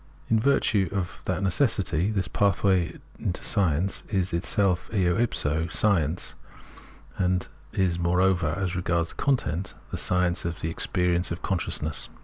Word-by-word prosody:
In 110 - +5
virtue 110 -7 +2
of 100 -3 -3
that 100 - -1
necessity 95 - +1
this 95 -4 -1
pathway 95 -3 +1 0.4
to - - -3
science 95 -2 +1
is 95 -4 0
itself 90 +1 +1
eo 90 -5 +2
if 120 +2 +1
so 80 +3 +1
science, 90 -4 +1 0.9
and 90 -1 +1 0.2
is, 90 -3 0
moreover, 90 -2 +2
as 95 -2 -2
regards 85 -1 0
its - - -6
content. 100 - 0 0.2
Science 90 -1 +1
of 85 -1 -4
the 80 - -2
Experience 90 +1 0
of 85 - -5
Consciousness. 95 -3 -1
90 Hz, 135 wpm, -26 LUFS, 85-100 Hz, 0.9 s, In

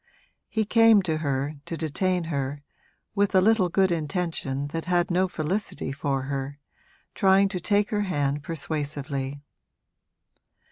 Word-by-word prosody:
He 220 -1 0
came 225 -1 +5
to 160 -3 -1
her, 145 -1 -2
to 165 - -4
detain 175 +4 0
her, 145 -2 -3 0.5
with 200 -1 +1
a - - +8
little 200 -2 +3
good 190 +1 +2
intention 155 -4 -2
that 165 +2 -4
had 175 0 +1
no 185 +2 +2
felicity 180 -2 -3
for 135 -1 -2
her, 140 +1 -4 0.6
trying 195 0 +4
to 190 -2 -3
take 205 +2 +1
her 210 -1 +1
hand 145 -7 -1
persuasively. 145 -3 -3
165 Hz, 135 wpm, -26 LUFS, 145-190 Hz, 0.6 s, a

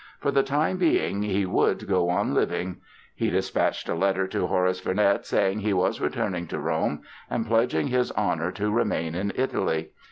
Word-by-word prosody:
For 140 - 0
the 140 0 +4
time 145 +7 0
being 330 - +1
he 100 -1 0
would 90 - +1
go 90 -3 +2
on 100 +4 +1
living! 90 0 -1 0.4
He - - -1
dispatched - - 0
a - - 0
letter 95 +2 +1
to - - -1
Horace 90 0 +1
Vernet 100 +2 +1
saying 95 +2 +1
he 105 0 0
was 90 -1 +1
returning 90 -2 -2
to - - -4
Rome - - -1 0.3
and 115 - -1
pledging 115 +5 +1
his 125 -1 +1
honor 90 -4 0
to 105 +1 -1
remain 85 -7 0
in 95 +3 -2
Italy. 80 -11 -1
100 Hz, 180 wpm, -26 LUFS, 90-115 Hz, 0.4 s, the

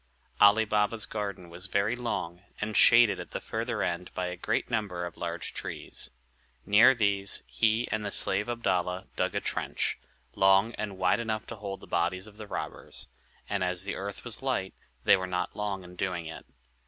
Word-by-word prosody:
Ali 105 +2 +7
Baba's 105 +1 +1
garden 100 -4 -4
was 85 +3 -7
very 100 +4 +1
long, 90 -8 -3 0.2
and 105 0 -3
shaded 115 -2 +7
at - - -7
the - - -4
further 110 -2 -2
end 90 0 -2
by 90 - -1
a 90 - -4
great 110 +5 -1
number 100 -7 -2
of 85 - -7
large 85 0 -4
trees. - - -4 0.6
Near 110 +6 +7
these 100 -3 +2
he 110 +2 +1
and 110 -1 -1
the 105 - -2
slave 100 +1 +2
Abdalla 95 -5 0
dug - - 0
a - - +1
trench, - - -2 0.3
long 95 +4 +4
and 100 -3 -4
wide 90 +4 +3
enough 110 -2 -2
to 115 - -7
hold 100 -2 -6
the - - -10
bodies 90 +2 0
of 105 -1 -11
the 110 -1 -8
robbers; - - -5 0.4
and 100 -2 -1
as 90 0 -1
the 100 - -3
earth 100 +1 -5
was 120 -2 -4
light, 125 -8 -1 0.3
they - - +7
were 95 -1 -3
not 90 0 -2
long 100 -2 -3
in 90 0 -12
doing 90 -2 -2
it. 80 - -8
100 Hz, 190 wpm, -29 LUFS, 90-110 Hz, 0.6 s, Ali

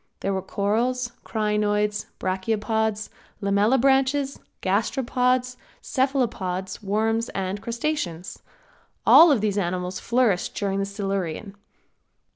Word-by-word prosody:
There 195 - -1
were 190 - -1
corals, 235 +6 -1
crinoids, 210 -1 0
brachiopods, 215 +3 -1 0.3
lamellibranches, 265 +7 +2 0.2
gasteropods, 250 +4 +1 0.2
cephalopods, 230 -9 -1
worms 220 +3 0
and 195 +1 -2
crustaceans. 230 - -3 0.7
All 330 -1 +9
of 255 -7 +2
these 210 -1 0
animals 180 0 -2
flourished 235 -7 +1
during 195 -1 -1
the 195 - 0
Silurian. 195 -1 -3
210 Hz, 90 wpm, -24 LUFS, 195-250 Hz, 0.7 s, All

